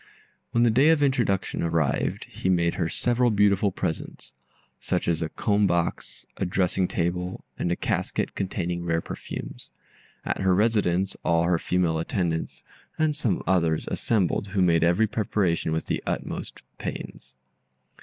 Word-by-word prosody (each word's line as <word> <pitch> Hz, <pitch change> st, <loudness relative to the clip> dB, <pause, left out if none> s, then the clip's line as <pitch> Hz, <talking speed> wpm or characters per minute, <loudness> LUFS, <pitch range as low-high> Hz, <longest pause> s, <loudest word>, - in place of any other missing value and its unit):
When 120 Hz, -, +2 dB
the 120 Hz, -, +5 dB
day 135 Hz, +7 st, +5 dB
of 160 Hz, -3 st, +4 dB
introduction 120 Hz, -9 st, +1 dB
arrived, 80 Hz, -4 st, 0 dB
he 95 Hz, -, -4 dB
made 85 Hz, -2 st, +2 dB
her 85 Hz, -3 st, -1 dB
several 120 Hz, +4 st, +1 dB
beautiful 100 Hz, -2 st, +3 dB
presents, 80 Hz, -2 st, -4 dB, 0.5 s
such -, -, -2 dB
as 85 Hz, -1 st, +1 dB
a 80 Hz, -, -1 dB
comb 105 Hz, +2 st, +1 dB
box, 85 Hz, -1 st, -2 dB
a -, -, -2 dB
dressing 90 Hz, 0 st, +1 dB
table, 90 Hz, +1 st, -2 dB
and 85 Hz, -, 0 dB
a -, -, +2 dB
casket -, -, -2 dB
containing 90 Hz, -2 st, -2 dB
rare 80 Hz, -1 st, 0 dB
perfumes. -, -, -7 dB, 0.6 s
At -, -, -2 dB
her 95 Hz, -1 st, +3 dB
residence 100 Hz, -3 st, +1 dB
all 85 Hz, -1 st, +3 dB
her 85 Hz, 0 st, +2 dB
female 90 Hz, -3 st, +1 dB
attendants, 85 Hz, -1 st, -2 dB, 0.3 s
and 155 Hz, -1 st, +1 dB
some 115 Hz, -, -1 dB
others, 85 Hz, -4 st, +1 dB
assembled, 100 Hz, -2 st, 0 dB
who 100 Hz, -1 st, +1 dB
made 85 Hz, -2 st, +3 dB
every 85 Hz, +6 st, +4 dB
preparation 100 Hz, -6 st, 0 dB
with 80 Hz, 0 st, -1 dB
the -, -, -2 dB
utmost -, -, -4 dB, 0.2 s
pains. -, -, -7 dB
90 Hz, 150 wpm, -26 LUFS, 85-105 Hz, 0.6 s, the